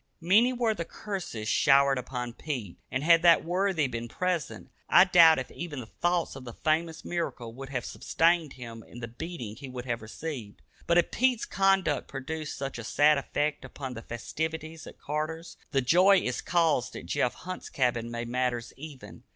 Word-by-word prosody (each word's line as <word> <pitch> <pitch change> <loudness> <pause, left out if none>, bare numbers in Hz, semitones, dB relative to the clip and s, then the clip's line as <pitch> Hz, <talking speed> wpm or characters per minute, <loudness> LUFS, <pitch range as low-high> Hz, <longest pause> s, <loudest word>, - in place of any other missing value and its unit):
Many 210 +9 +4
were 240 -3 +1
the 170 - -4
curses 175 - -6
showered 135 0 +4
upon 125 -1 -5
Pete, 120 - -5
and 130 - -2
had 165 +1 +6
that 170 -2 +5
worthy 180 -2 +1
been 120 -2 -4
present, 180 +2 -3 0.2
I - - +8
doubt 170 -4 +7
if 130 - -4
even 165 -5 -6
the 120 - -7
thought 175 +8 -1
of 135 - -9
the 120 -2 -8
famous 160 +3 -1
miracle 130 -9 -3
would 135 +2 -8
have 125 -3 -3
sustained 165 -3 +1
him 115 -3 -9
in 120 - -12
the 115 - -5
beating 120 -3 -7
he 135 0 -8
would 125 -1 -7
have 115 -3 -2
received. 115 -1 -7 0.2
But 170 - +4
if 175 - +3
Pete's 250 -2 +2
conduct 195 -6 +2
produced 150 +3 -5
such 135 -3 -4
a - - -6
sad 150 +5 +4
effect 145 +2 -2
upon 130 -3 -7
the 115 - -7
festivities 160 +7 -5
at - - -11
Carter's, 155 +3 -4
the 135 - +1
joy 180 +10 +5
it 125 -8 -2
caused 165 -8 +1
at - - -7
Jeff 125 - 0
Hunt's 185 0 -7
cabin 120 -3 0
made 120 0 -4
matters 125 -1 -2
even. 145 -2 -10
150 Hz, 185 wpm, -28 LUFS, 125-170 Hz, 0.2 s, I